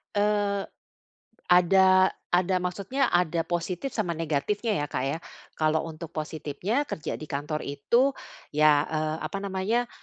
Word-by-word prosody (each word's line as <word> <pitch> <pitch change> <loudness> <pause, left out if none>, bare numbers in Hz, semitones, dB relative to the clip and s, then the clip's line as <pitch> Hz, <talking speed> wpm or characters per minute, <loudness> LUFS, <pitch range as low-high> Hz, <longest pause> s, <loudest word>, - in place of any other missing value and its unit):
Eee, 205 -1 +1 0.9
ada 185 +1 +6 0.3
ada 185 +1 +2
maksudnya 200 +9 -1
ada 175 -1 +2
positif 175 +7 -2
sama 185 -6 0
negatifnya 165 +8 -1
ya, - - -4
Kak, 130 - -1
ya. 145 - -1 0.4
Kalau 155 0 +2
untuk 160 0 -8
positifnya 155 - -2
kerja 155 - -4
di 155 - -8
kantor 150 +1 -3
itu, 235 - +2 0.4
ya, 150 0 +5
eee, 155 0 -2
apa 195 - -3
namanya, 200 +5 -1
175 Hz, 130 wpm, -27 LUFS, 155-200 Hz, 0.9 s, ada